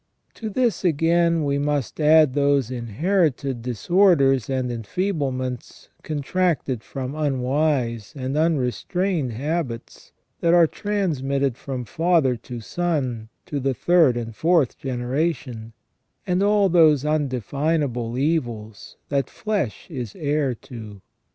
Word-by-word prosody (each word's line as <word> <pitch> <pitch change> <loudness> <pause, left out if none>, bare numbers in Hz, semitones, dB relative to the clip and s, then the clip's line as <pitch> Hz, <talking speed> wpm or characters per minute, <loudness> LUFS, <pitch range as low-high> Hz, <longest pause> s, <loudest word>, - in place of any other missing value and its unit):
To 220 - -6
this 235 0 0
again 170 0 +2
we 140 0 0
must 145 -2 -2
add 155 -2 +5
those 140 -3 +2
inherited 135 - 0
dis 120 -2 -6
orders 150 - +4
and 130 -2 -1
enfeeblements 130 - -3
contracted 155 -4 -1
from 135 -1 -5
unwise 135 -5 0
and 130 0 -3
unre 150 -6 +2
strained 175 - -2
habits 135 -2 -4 0.3
that 170 0 +3
are 170 -1 +7
transmitted 140 - -1
from 130 -1 -5
father 160 - +2
to 120 +1 -8
son 130 -7 -2 0.2
to 145 - -3
the 135 -1 -1
third 165 -8 +4
and 115 -2 -5
fourth 160 -2 +2
generation, 125 -2 -3 0.5
and 180 -1 +1
all 205 0 +4
those 160 -5 +4
undefinable 140 -3 -1
evils 120 -8 -2
that 140 -2 0
flesh 205 - -3
is 125 -8 -5
heir 145 -3 0
to. 110 -4 -10
140 Hz, 120 wpm, -23 LUFS, 125-165 Hz, 0.5 s, are